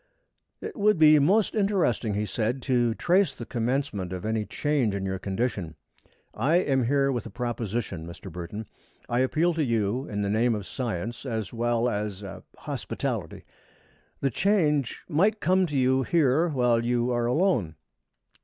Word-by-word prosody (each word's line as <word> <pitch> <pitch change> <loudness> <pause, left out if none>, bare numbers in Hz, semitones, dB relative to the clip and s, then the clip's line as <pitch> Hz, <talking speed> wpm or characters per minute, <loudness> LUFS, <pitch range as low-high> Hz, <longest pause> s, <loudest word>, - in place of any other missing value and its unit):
"It - - -6
would 210 -1 +3
be 155 -1 +7
most 195 +9 +3
interesting," 185 - +1
he 105 +1 0
said, 120 +4 -2
"to 120 -4 +1
trace 185 +5 +2
the 120 - -7
commencement 115 -5 -2
of 90 0 -5
any 110 -1 -1
change 140 -8 0
in 95 -1 -3
your 95 -1 -2
condition. 95 -4 -2 0.6
I 135 +10 +1
am 135 -8 +2
here 140 +2 +2
with 120 -3 -3
a - - -8
proposition, 115 -6 -3
Mr. 85 +2 -9
Burton. 90 +6 -6 0.4
I 120 - 0
appeal 155 +7 +2
to 160 -1 0
you 115 +1 0
in 105 -1 -2
the - - -1
name 115 +2 +2
of 105 -2 -5
science 115 -2 -4
as 110 -5 -4
well 120 0 +1
as 105 -3 -3
er 95 - -8 0.2
hospitality. - - -4 0.8
The 135 - +1
change 150 - +1
might 195 +7 +2
come 185 +2 +2
to 150 -3 -2
you 130 0 +3
here 155 +1 +2
while 125 -5 +2
you 120 +1 +1
are 120 -1 0
alone. 125 - +1
120 Hz, 165 wpm, -26 LUFS, 105-150 Hz, 0.8 s, be